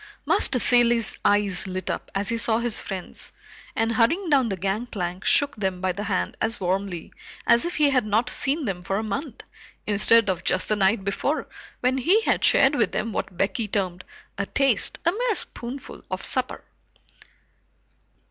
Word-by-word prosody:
Master 260 - +4
Cilley's 240 -2 +3
eyes 205 -3 +2
lit 185 0 -5
up - - -5
as 200 +1 -1
he 230 - 0
saw 225 -1 +2
his 235 -1 -1
friends, 190 -3 -7 0.4
and 225 0 +1
hurrying 315 - +1
down 265 -5 +4
the 195 - -3
gangplank, 195 -2 -3
shook 285 0 +3
them 190 -4 -2
by 185 0 0
the 205 +4 -5
hand 200 -3 -1
as 225 +1 -1
warmly 185 -1 -3 0.3
as 235 - +4
if 345 - -3
he 295 -2 +3
had 255 -2 +2
not 215 +3 +1
seen 280 +4 -1
them 190 -5 -3
for 195 +2 -2
a 215 - -2
month, 230 +5 -5 0.4
instead 215 +2 +4
of 185 -3 -1
just 185 - 0
the 215 - +2
night 195 +1 +2
before 205 +10 -2 0.3
when 255 +1 +1
he 355 - +4
had - - 0
shared - - +5
with - - +1
them 230 - -2
what 185 -2 -4
Becky 210 +4 -1
termed, 185 -3 -2 0.4
"a 200 - -1
taste, 270 -6 +2
a 340 - +4
mere 460 +2 -1
spoonful" 255 -4 -5
of - - -4
supper. - - -3
220 Hz, 175 wpm, -24 LUFS, 195-250 Hz, 0.4 s, shared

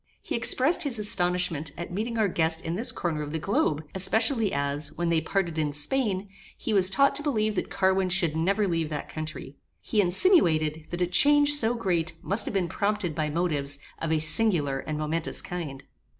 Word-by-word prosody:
He - - -5
expressed 295 +8 +3
his 280 -7 0
astonishment 175 -7 +1
at 170 +1 -6
meeting 225 +4 -3
our 215 -2 +2
guest 160 -2 -1
in 165 - -3
this 225 +8 -2
corner 160 -3 -3
of 145 -1 -5
the - - -1
globe, 160 - 0
especially 220 +3 +1
as, 140 +1 -2
when 175 0 -2
they 165 -1 +2
parted 175 -5 -2
in 150 -2 -1
Spain, 200 - -1 0.3
he 225 - -3
was 190 -2 +6
taught 275 +8 +3
to 280 - +1
believe 215 -8 0
that 195 - -3
Carwin 190 -1 +1
should 175 -4 +1
never 195 +6 +1
leave 165 -3 -1
that 150 -2 -5
country. 155 -3 -7 0.2
He 210 - 0
insinuated, 165 - +2
that 175 +1 -2
a - - +3
change 290 +11 +4
so 240 -5 +2
great 175 -7 -1
must 205 +2 +2
have - - -4
been 185 -3 +1
prompted 200 -1 -2
by 150 0 -2
motives 150 -4 -1 0.2
of 165 - -3
a 160 - +2
singular 155 -4 +2
and 155 +2 -5
momentous 155 +2 -3
kind. 160 -7 -6
175 Hz, 195 wpm, -26 LUFS, 155-210 Hz, 0.3 s, was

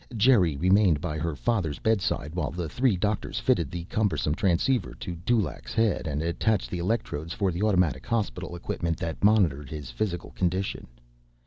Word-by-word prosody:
Geri 100 - +4
remained 95 -1 +4
by 75 +2 -3
her 80 -1 -2
father's 80 - -1
bedside 95 -8 0
while 90 - -1
the 85 -1 -4
three 120 - +1
doctors 105 +3 -1
fitted 80 -5 +1
the 85 +2 -5
cumbersome 85 -6 0
transceiver 100 +7 +1
to 90 -3 -6
Dulaq's 105 +5 -1
head 110 -6 +1
and 75 0 -2
attached 95 +5 0
the 90 - -2
electrodes 85 -5 -2
for 100 -1 0
the 85 +3 -4
automatic 90 - +1
hospital 100 -6 -2
equipment 85 -1 -2
that 80 +3 -5
monitored 90 -10 +3
his 75 -5 -6
physical 90 - -3
condition. 95 +2 -2
90 Hz, 160 wpm, -27 LUFS, 80-105 Hz, -, Geri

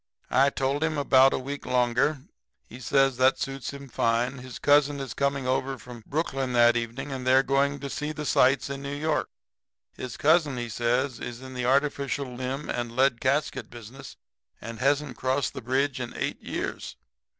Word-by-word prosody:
"I 135 +2 +5
told 140 +2 -1
him 155 -1 0
about 135 -1 +5
a - - 0
week 140 +2 -5
longer. 125 +3 +1 0.4
He 120 - -12
says 135 0 +2
that'll 130 +1 +4
suit 135 -1 -4
him 140 0 -9
fine. 120 +2 0
His 125 -1 -9
cousin 145 0 +3
is 135 -5 -5
coming 140 0 -1
over 130 +1 -1
from 120 -1 -11
Brooklyn 135 -4 -2
that 120 0 +5
evening 120 +4 -3
and 130 -1 -5
they 130 - +5
are 135 - +5
going 140 +1 +1
to 140 - -4
see 150 +2 -3
the 150 -1 -5
sights 135 +1 +3
of 140 - -4
New 140 +1 -5
York. 155 +1 -1 0.6
His 130 -3 -7
cousin, 155 -3 +3
he 120 -1 -4
says, 120 +3 0
is 120 +1 -7
in 130 0 -9
the 125 -1 -3
artificial 140 -1 0
limb 130 +3 -4
and 120 -1 -3
lead 130 -2 +2
casket 140 +3 0
business, 120 +3 -11 0.4
and 115 +1 -8
hasn't 140 +1 +1
crossed 130 +1 0
the - - -6
bridge 130 +2 0
in 120 -1 -5
eight - - -3
years. - - -5
135 Hz, 185 wpm, -26 LUFS, 125-140 Hz, 0.6 s, I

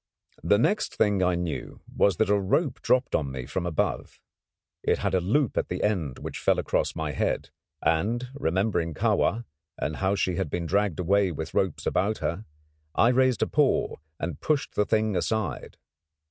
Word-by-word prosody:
The 100 - +3
next 200 - +1
thing 105 -3 +2
I 90 -1 +2
knew 85 -2 -4 0.2
was 100 -4 +3
that 100 - +2
a - - +5
rope 125 - 0
dropped 125 +2 +2
on 70 -3 0
me 65 -2 -5
from 85 +6 -3
above. 80 - -2 0.6
It - - +1
had - - -1
a 95 - +3
loop 120 +8 +1
at - - -3
the 90 - -3
end 85 -11 0
which - - -6
fell - - +2
across - - 0
my 80 -2 -2
head; 65 - -1 0.3
and 110 +10 +1
remembering 90 - 0
Kahwa, 115 +10 +1 0.3
and 75 +1 -3
how 95 +1 +1
she 90 -3 0
had 95 -5 -1
been 85 +3 -2
dragged 100 0 0
away 95 +1 +2
with 80 0 -6
ropes 95 -5 0
about 105 +3 +1
her, 95 +6 -3 0.5
I 115 - +5
raised 130 -1 +3
a - - 0
paw - - +1 0.2
and 85 -4 -4
pushed 150 -3 0
the 105 - +2
thing 110 -2 +1
aside. 110 +4 -2
95 Hz, 180 wpm, -26 LUFS, 85-110 Hz, 0.6 s, a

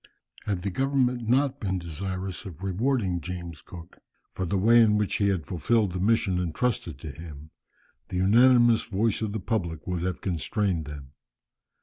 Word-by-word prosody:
Had 100 -3 -1
the 100 - -2
government 125 -1 0
not 135 +2 +2
been 95 -3 -1
desirous 95 +2 -5
of 90 -1 -9
rewarding 95 -2 0
James 85 -2 -7
Cook 85 -2 -12 0.3
for 95 - -3
the 100 - 0
way 115 +5 +6
in 105 -2 +4
which 105 -1 0
he 100 - +2
had 95 -5 0
fulfilled 105 +4 +1
the 90 - -4
mission 100 -2 +2
entrusted 90 - -2
to 80 - -6
him, 75 -1 -11 0.6
the 90 - -3
unanimous 120 +4 +5
voice 110 0 0
of 110 -2 -1
the 110 - -3
public 85 -6 -3
would 90 -2 -2
have 90 0 -2
constrained 90 -1 -1
them. 70 -2 -9
95 Hz, 165 wpm, -26 LUFS, 85-115 Hz, 0.6 s, way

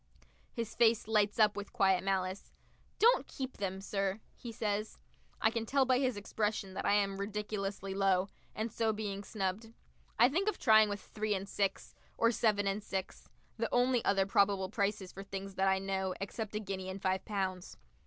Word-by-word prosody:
His 230 -1 -4
face 225 -2 +3
lights 210 -2 +2
up 210 -2 +5
with 205 0 -6
quiet 190 -2 +3
malice. 190 0 -2 0.5
"Don't 470 +3 +4
keep 265 -1 -6
them, 190 -1 -3
sir," 195 0 -1 0.2
he 235 - -8
says. 215 -1 -2 0.4
I 220 - +3
can 225 0 -3
tell 275 +1 +3
by 255 0 +3
his 255 -5 0
expression 205 -1 -2
that - - -3
I - - +4
am 200 -1 +2
ridiculously 200 -1 -3
low, 195 -1 +2 0.3
and 220 +1 -2
so 225 0 +1
being 205 -2 -4
snubbed. 210 +2 -3 0.4
I 240 - +7
think 365 +10 +1
of - - -3
trying 220 -3 +6
with 205 0 -4
three 215 -1 -2
and 195 +1 -4
six, 200 -1 -2 0.2
or 230 0 +4
seven 215 -3 +2
and 195 +2 0
six; 190 -2 -5 0.3
the 230 0 -1
only 245 -1 +3
other 195 -1 +3
probable 195 -1 +2
prices 200 -3 -1
for 195 - -8
things 195 0 -6
that 190 0 +1
I 190 0 +4
know, 190 -1 -2
except 210 +2 -5
a - - 0
guinea 190 -2 -5
and 190 +1 -5
five 190 0 0
pounds. 190 -3 -3
205 Hz, 185 wpm, -33 LUFS, 195-220 Hz, 0.5 s, I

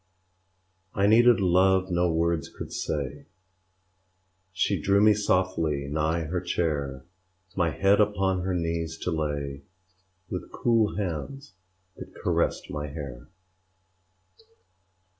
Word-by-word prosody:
I 100 - +2
needed 120 +3 +6
love 95 0 +3
no 90 0 +2
words 80 -1 0
could - - -9
say; 70 -4 -4 1.2
She 95 -2 0
drew 100 +5 +3
me 105 +1 +6
softly 90 -8 0
nigh 80 +2 0
her 85 +3 -3
chair, 75 -7 -2 0.5
My 85 -3 +2
head 100 +5 +3
upon 95 -3 +1
her 95 0 -1
knees 85 -1 -2
to 90 - -1
lay, 70 -3 -3 0.7
With - - -6
cool 115 -3 +1
hands 105 - -5 0.4
that - - -11
caressed - - -1
my 75 0 -4
hair. 70 -5 -8
85 Hz, 110 wpm, -26 LUFS, 75-95 Hz, 1.2 s, needed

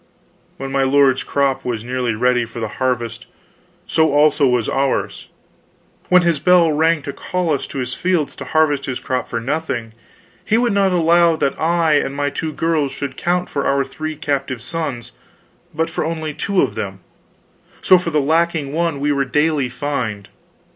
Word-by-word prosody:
When 135 0 -6
my 135 0 +1
lord's 135 -1 +3
crop 135 -1 0
was 115 -3 -3
nearly 125 -2 -2
ready 125 +2 +2
for 115 +1 -8
the 115 - -2
harvest, 120 -2 -2 0.6
so 160 -1 +2
also 150 -1 +4
was 125 -3 +1
ours; 135 0 -1 0.8
when 180 -1 +6
his 170 -4 +1
bell 175 0 +4
rang 160 0 +2
to 140 - -5
call 180 -3 -2
us 140 - -2
to - - -8
his 125 -1 -3
fields 175 -5 -1
to 140 - -7
harvest 145 0 +1
his 130 - -3
crop 130 -1 -2
for 115 - -3
nothing, 120 -3 -3 0.5
he 220 - +2
would 240 -2 +1
not 195 -1 +2
allow 170 -1 +4
that 140 -3 0
I 165 -1 +2
and 135 - -3
my 145 0 -1
two 155 +3 -3
girls 155 -2 0
should 135 0 -5
count 180 +3 -1
for 140 - -2
our 140 0 +2
three 155 +3 -5
captive 135 -4 -3
sons, 140 -8 -4 0.6
but 160 0 -2
for - - -2
only 160 -1 -3
two 195 +4 +1
of - - -1
them; 95 -3 -5 0.8
so, 185 - +6
for 170 - -3
the 155 -2 +1
lacking 160 -1 0
one 165 -3 -1
were 145 +1 +1
we 140 -1 0
daily 150 -1 +1
fined. 120 -7 -4
145 Hz, 180 wpm, -19 LUFS, 130-165 Hz, 0.8 s, when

